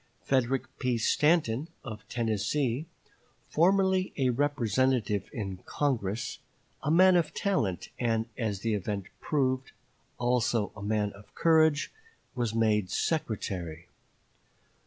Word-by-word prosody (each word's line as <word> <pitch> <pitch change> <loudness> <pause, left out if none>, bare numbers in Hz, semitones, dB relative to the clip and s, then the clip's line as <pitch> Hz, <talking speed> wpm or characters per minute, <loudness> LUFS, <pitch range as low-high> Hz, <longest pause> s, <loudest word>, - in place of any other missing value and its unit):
Frederick 130 0 +1 0.2
P. 125 -3 +1
Stanton, 150 +2 +2 0.2
of 110 -3 -8
Tennessee, 120 +5 0 0.6
formerly 190 +2 +3
a 130 -3 +2
representative 125 -5 +1
in 95 -4 -4
Congress, 120 -5 -1 0.4
a 145 - -2
man 185 +3 +6
of 170 -3 +1
talent 115 - 0
and, 115 -2 +1
as 105 -5 -2
the 115 +1 0
event 100 -1 -2
proved, 130 -3 0 0.4
also 120 -3 +1
a 105 - -9
man 105 0 0
of 100 +1 -17
courage, 160 -3 +3 0.4
was 120 -4 -2
made 105 -4 +2
secretary. 90 - -2
120 Hz, 110 wpm, -29 LUFS, 105-145 Hz, 0.6 s, man